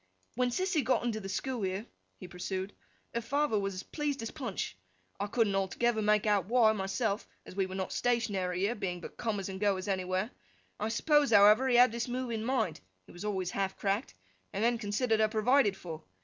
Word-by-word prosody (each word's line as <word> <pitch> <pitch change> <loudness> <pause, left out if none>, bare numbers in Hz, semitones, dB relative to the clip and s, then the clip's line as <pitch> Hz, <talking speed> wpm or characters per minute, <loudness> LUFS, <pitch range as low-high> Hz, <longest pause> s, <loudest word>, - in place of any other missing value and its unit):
'When 250 +1 +1
Sissy 360 +2 0
got 250 +1 +2
into 230 -3 -1
the 195 -2 -7
school 245 +4 -2
here,' 190 +2 -2 0.3
he 185 - -9
pursued, 185 +2 -4 0.4
'her 235 - -1
father 280 -1 +1
was 195 -1 -2
as 185 - -5
pleased 290 -5 -3
as 225 - -4
Punch. 240 - -4 0.4
I 205 - -1
couldn't 215 -1 +1
altogether 220 +4 +1
make 210 0 +3
out 205 -4 +2
why, 230 -1 +5
myself, 200 +1 -1 0.2
as - - -11
we 195 -1 +1
were 185 - -7
not 190 -1 -3
stationary 200 -7 0
here, 205 +4 +2
being 190 -6 -3
but - - -9
comers 205 -4 -2
and 190 -1 -6
goers 195 -2 +1
anywhere. 185 +2 -1 0.5
I 215 - -1
suppose, 295 +4 +3
however, 210 +4 +7
he 250 - +3
had 245 -1 +7
this 235 +2 -3
move 250 0 -3
in 225 - -1
his 220 - -4
mind—he 120 - -3
was 175 - -9
always 190 -4 -2
half 195 -1 -2
cracked—and 95 - -4
then 235 0 +2
considered 220 +1 +1
her 215 0 +4
provided 215 -1 +3
for. 165 -4 -8
210 Hz, 200 wpm, -31 LUFS, 190-240 Hz, 0.5 s, however